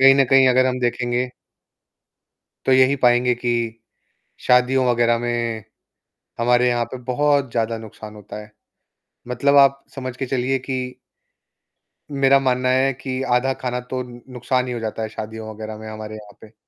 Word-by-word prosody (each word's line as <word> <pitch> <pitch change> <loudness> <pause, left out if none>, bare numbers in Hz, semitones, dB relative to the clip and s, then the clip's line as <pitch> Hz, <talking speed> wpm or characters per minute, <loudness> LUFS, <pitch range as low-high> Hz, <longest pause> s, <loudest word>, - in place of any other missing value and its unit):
कहीं 135 0 +8
न 135 0 +4
कहीं 135 -1 +6
अगर 130 +1 +4
हम 130 0 -1
देखेंगे 120 0 -1 1.4
तो - - +2
यही 130 +1 +5
पाएँगे 125 -1 +3
कि 120 0 -2 0.9
शादियों 125 +1 +3
वगैरह 120 -1 +2
में 120 -2 -2 0.7
हमारे 120 +1 +3
यहाँ 120 -1 +1
पे 130 - -5
बहुत 140 +1 +1
ज़्यादा 115 -1 -1
नुकसान 110 -1 -11
होता 105 0 -9
है। 105 0 -13 0.8
मतलब 140 +4 +2
आप 140 0 +5
समझ 130 -2 -6
के 135 - -3
चलिए 130 +1 0
कि 130 +1 -4 1.4
मेरा 140 -1 +4
मानना 130 -1 0
है 130 +1 +3
कि 130 0 -5
आधा 135 +2 +1
खाना 125 -1 -1
तो 130 -1 -2 0.3
नुकसान 125 +1 -1
ही 125 - -3
हो 120 - -4
जाता 110 0 -4
है 110 - -4
शादियों 110 0 -7
वगैरह 110 0 -7
में 110 0 -10
हमारे 110 0 -7
यहाँ 105 -1 -13
पे। 110 0 -15
125 Hz, 160 wpm, -21 LUFS, 115-130 Hz, 1.4 s, कहीं